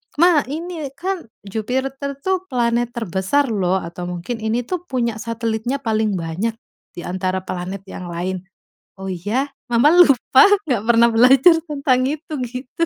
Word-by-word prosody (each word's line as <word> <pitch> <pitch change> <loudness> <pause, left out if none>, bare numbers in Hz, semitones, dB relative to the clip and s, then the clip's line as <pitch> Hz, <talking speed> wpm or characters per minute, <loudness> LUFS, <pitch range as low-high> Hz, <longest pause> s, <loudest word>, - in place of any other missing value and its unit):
"Ma, 340 0 +5
ini 320 0 -5
kan 370 -6 -4 0.2
Jupiter 265 +7 -3
tuh 375 0 -1
planet 240 -2 +1
terbesar 225 +6 0
loh." 190 -3 +1
Atau 175 +1 -6
mungkin, 180 +7 -5
"Ini 220 +2 -1
tuh 360 +6 -5
punya 235 -4 -1
satelitnya 230 +2 -2
paling 220 -2 0
banyak 180 +7 -2 0.4
di 175 - -7
antara 185 +1 -2
planet 185 +1 -5
yang 180 -2 -8
lain." 180 +2 -4 0.5
"Oh 190 0 -6
ya? 215 +11 -2 0.2
Mama 240 +5 +4
lupa, 290 - +6 0.2
nggak 245 - -1
pernah 235 0 +5
belajar 260 +8 +6
tentang 265 -3 +1
itu." 310 +2 -5
Gitu. 250 +5 -4
235 Hz, 145 wpm, -20 LUFS, 195-275 Hz, 0.5 s, lupa